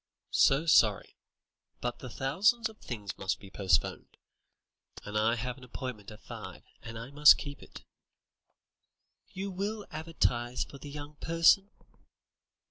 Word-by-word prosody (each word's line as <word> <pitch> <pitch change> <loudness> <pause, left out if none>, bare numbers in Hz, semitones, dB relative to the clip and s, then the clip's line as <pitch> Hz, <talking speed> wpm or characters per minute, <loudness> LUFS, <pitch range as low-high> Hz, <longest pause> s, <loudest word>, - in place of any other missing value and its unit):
"So 135 +4 +4
sorry, 110 -10 +4 0.6
but 120 0 -3
the 130 - -8
thousands 195 - +2
of 220 - -16
things 105 -6 -6
must 95 -1 -1
be 100 -1 -13
postponed. 95 -7 0 0.9
I 105 +2 +1
have 125 +3 -4
an - - -15
appointment 125 -4 -7
at 105 -1 -12
five, - - -9 0.2
and 115 0 -8
I 115 +4 -8
must 150 +1 +8
keep 145 -1 -7
it." - - -12 1.5
"You 195 +1 -5
will 205 +3 -3
advertise 125 -6 -1
for 140 - -12
the 145 - -9
'young 145 +1 -8
person'?" 165 +5 +4
135 Hz, 130 wpm, -30 LUFS, 115-165 Hz, 1.5 s, must